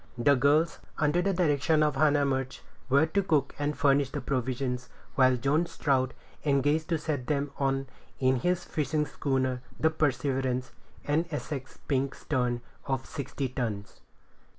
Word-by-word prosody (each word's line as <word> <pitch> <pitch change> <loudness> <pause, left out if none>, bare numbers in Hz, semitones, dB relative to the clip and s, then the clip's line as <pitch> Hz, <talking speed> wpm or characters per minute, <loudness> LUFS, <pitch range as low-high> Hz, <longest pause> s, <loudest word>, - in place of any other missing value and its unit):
The 140 +4 +4
girls, 145 +5 +3 0.2
under 155 +3 +2
the 195 +2 +1
direction 155 -3 +2
of 150 -2 +1
Hannah 145 0 +3
Murch, 130 -1 -2 0.3
were 140 +4 +5
to 180 +5 +1
cook 150 -7 +1
and 145 +1 -1
furnish 140 -1 +3
the 145 - -4
provisions, 125 -1 -2 0.2
while 130 -3 +4
John 145 +7 +1
Strout 130 -5 0 0.3
engaged 145 +3 +2
to 165 - +2
set 150 -5 -3
them 145 -1 0
on 135 -1 +1 0.3
in 130 0 +3
his 180 +7 0
fishing 150 0 0
schooner, 130 -3 -1 0.2
the 160 - +3
Perseverance, 130 -3 0 0.3
an 155 +4 +1
Essex 145 -3 -5
pink 135 -1 0
stern, 125 -4 -1 0.3
of 135 -1 -1
sixty 140 -1 -4
tons. 115 -5 -4
140 Hz, 150 wpm, -29 LUFS, 130-150 Hz, 0.3 s, were